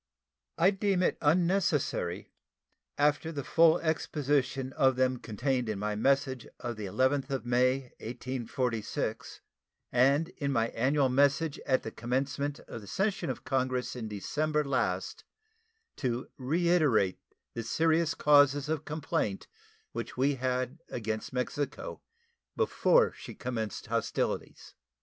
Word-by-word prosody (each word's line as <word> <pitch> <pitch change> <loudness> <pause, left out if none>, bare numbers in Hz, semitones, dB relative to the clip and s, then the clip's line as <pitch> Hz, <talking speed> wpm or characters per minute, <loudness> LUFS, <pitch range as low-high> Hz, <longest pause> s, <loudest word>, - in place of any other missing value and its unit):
I 175 +4 +5
deem 195 -2 +1
it - - +2
unnecessary, 165 - +1 0.7
after 150 +2 +2
the 145 -3 -4
full 165 +2 +5
exposition 145 -4 0
of 130 -1 +3
them 130 0 +2
contained 125 +2 -1
in 105 - -2
my 105 +1 -2
message 135 +2 +1
of 120 -2 -4
the 105 -2 -5
11th 130 +7 +1
of 135 -3 -3
May, 125 +2 +3 0.2
1846, 125 -1 -3 0.5
and 140 +6 +3
in 140 -5 -3
my 115 -3 +1
annual 135 +4 +2
message 140 +4 +2
at 130 - +2
the 110 - -5
commencement 135 +5 -2
of 115 - -9
the 100 - -12
session 195 - -1
of 130 - -4
Congress 130 -2 -1
in 115 -3 -5
December 150 +9 -1
last, 120 -10 -1 0.7
to 125 -2 -2
reiterate 150 - +2 0.3
the 115 - -3
serious 160 +7 +1
causes 145 -1 +4
of 155 -1 -2
complaint 145 -9 -2 0.5
which - - -6
we 135 +3 +3
had 130 +2 -2
against 110 -2 -3
Mexico 130 +3 -3 0.6
before - - +3
she - - -10
commenced 115 -5 -4
hostilities. - - -2
135 Hz, 125 wpm, -30 LUFS, 120-150 Hz, 0.7 s, I